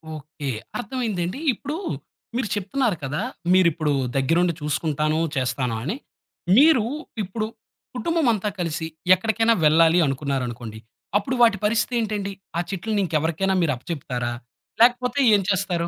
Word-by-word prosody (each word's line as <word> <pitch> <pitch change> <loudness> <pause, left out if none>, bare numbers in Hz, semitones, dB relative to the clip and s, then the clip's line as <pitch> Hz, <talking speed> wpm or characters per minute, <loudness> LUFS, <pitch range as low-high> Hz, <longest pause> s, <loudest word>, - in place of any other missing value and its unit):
Okay. 150 -1 -7 0.3
అర్థమైందండి. 230 -6 -3
ఇప్పుడు 285 +5 -5 0.6
మీరు 245 -2 0
చెప్తున్నారు 210 +2 0
కదా! 140 +6 -2 0.3
మీరిప్పుడు 170 -5 +3 0.2
దగ్గరుండి 170 +6 +2
చూసుకుంటాను, 155 +1 0 0.2
చేస్తాను 130 -2 -1
అని. 170 - -2 0.6
మీరు 285 -4 +6 0.4
ఇప్పుడు 215 +3 -3 0.5
కుటుంబమంతా 245 - +1
కలిసి 165 -2 -2 0.3
ఎక్కడికైనా 225 +4 +2
వెళ్ళాలి 165 +3 +5
అనుకున్నారనుకోండి, 125 -5 -3 0.4
అప్పుడు 210 +6 -2
వాటి 225 -4 +6
పరిస్థితి 220 +3 +1
ఏంటండి? 205 -3 -2 0.2
ఆ - - +1
చెట్లని 205 +2 -1
ఇంక 165 - -8
ఎవరికైనా 170 +5 0
మీరు 160 -4 +2
అప్పచెప్తారా? 125 -4 -4 0.5
లేకపోతే, 250 +2 +4 0.2
ఏం 200 - +2
చేస్తారు? 175 -3 0
180 Hz, 115 wpm, -23 LUFS, 150-225 Hz, 0.6 s, మీరు